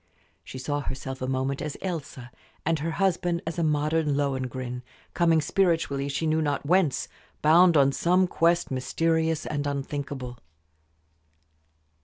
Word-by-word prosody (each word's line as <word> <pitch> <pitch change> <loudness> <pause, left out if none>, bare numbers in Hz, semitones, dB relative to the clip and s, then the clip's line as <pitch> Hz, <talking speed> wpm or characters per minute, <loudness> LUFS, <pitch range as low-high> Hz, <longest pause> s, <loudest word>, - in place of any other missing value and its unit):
She 130 - -9
saw 145 +3 -2
herself 135 -1 -5
a 130 - -2
moment 130 +1 -1
as 150 -1 -4
Elsa, 145 -9 -5 0.3
and 165 0 +1
her 160 +3 -2
husband 175 -1 0
as 165 +1 -4
a - - +1
modern 150 0 +1
Lohengrin, 130 -3 -2 0.3
coming 165 -2 +3
spiritually 160 -5 +1
she 140 +4 -2
knew 160 0 +2
not 145 -2 -1
whence, 165 -4 +2 0.4
bound 170 +2 +6
on 140 -1 +5
some 180 +6 +3
quest 170 -1 +1
mysterious 160 +4 0
and 145 -1 -2
unthinkable. 140 -3 -4
150 Hz, 135 wpm, -26 LUFS, 135-165 Hz, 0.4 s, bound